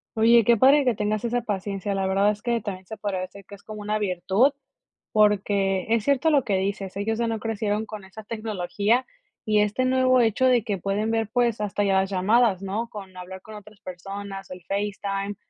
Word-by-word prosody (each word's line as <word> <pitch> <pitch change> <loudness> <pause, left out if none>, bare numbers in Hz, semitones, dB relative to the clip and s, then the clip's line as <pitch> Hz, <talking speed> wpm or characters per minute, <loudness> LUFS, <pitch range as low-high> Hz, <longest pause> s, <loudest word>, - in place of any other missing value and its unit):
Oye, 230 +1 +5
qué 235 +1 +4
padre 280 +5 +6
que 250 -2 +2
tengas 210 0 -2
esa 240 +1 0
paciencia, 200 -2 -3
la 195 0 -1
verdad 195 +2 +3
es 210 0 -7
que 235 0 0
también 190 -3 -6
se 220 +4 -8
podría 200 -3 -3
decir 195 +1 -9
que 200 - -11
es 200 - -20
como 215 -1 -8
una 210 +1 -1
virtud, 200 +6 +2 0.6
porque, 200 -3 +2
es 230 -2 +2
cierto 280 +3 +3
lo 285 -4 +3
que 200 -4 0
dices, 195 0 -3
ellos 220 +2 -1
ya 235 - +1
no 225 -1 -2
crecieron 215 -1 -2
con 215 -2 -8
esa 205 +3 -11
tecnología 215 +2 -1 0.4
y 215 -1 +3
este 210 +5 0
nuevo 255 0 +3
hecho 230 +2 +2
de 245 -3 +3
que 205 -4 -1
pueden 200 +4 -1
ver, 225 -2 0
pues, 235 -3 +1
hasta 205 0 -1
ya 195 -1 +2
las 190 - -3
llamadas, 200 +1 +2
¿no? 215 +5 -3
Con 195 -4 -10
hablar 185 +1 -8
con 215 +2 -11
otras 210 0 -13
personas, 195 +2 -8
el 180 0 -8
FaceTime, 200 0 -2
210 Hz, 210 wpm, -25 LUFS, 195-225 Hz, 0.6 s, padre